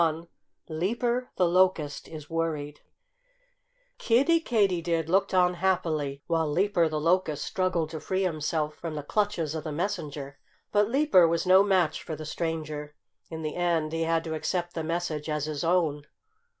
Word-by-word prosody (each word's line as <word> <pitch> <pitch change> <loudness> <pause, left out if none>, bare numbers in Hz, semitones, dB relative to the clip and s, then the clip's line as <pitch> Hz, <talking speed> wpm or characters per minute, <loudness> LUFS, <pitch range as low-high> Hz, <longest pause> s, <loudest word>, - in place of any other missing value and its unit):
XXI 165 0 0 0.4
LEAPER 235 +10 -1
THE 180 - +3
LOCUST 170 -5 +1
IS 155 -2 -9
WORRIED 155 -3 -3 1.2
Kiddie 280 +9 +3
Katydid 180 - +1
looked 195 +2 +2
on 180 -1 +3
happily 160 -6 -1
while 165 -2 0
Leaper 175 -1 +2
the 155 -1 -2
Locust 165 -2 +1
struggled 180 -4 -1
to 160 - -5
free 190 +4 -1
himself 155 -3 -1
from 165 -1 -6
the 150 - -4
clutches 190 -3 -1
of 160 -2 -4
the 155 - -4
messenger. 150 -5 -4 0.3
But 205 0 +3
Leaper 270 - +5
was 165 +2 0
no 185 +1 +7
match 185 -6 +2
for 160 - -5
the 155 - -8
stranger. 155 -2 -4 0.3
In 160 -1 -6
the 155 - -3
end 170 -3 0
he 165 - -1
had 165 0 +1
to 160 - -4
accept 175 +2 -2
the 165 - -3
message 160 -2 -3
as 150 -1 -1
his 150 -2 -4
own. 165 -4 +1
165 Hz, 165 wpm, -27 LUFS, 155-185 Hz, 1.2 s, no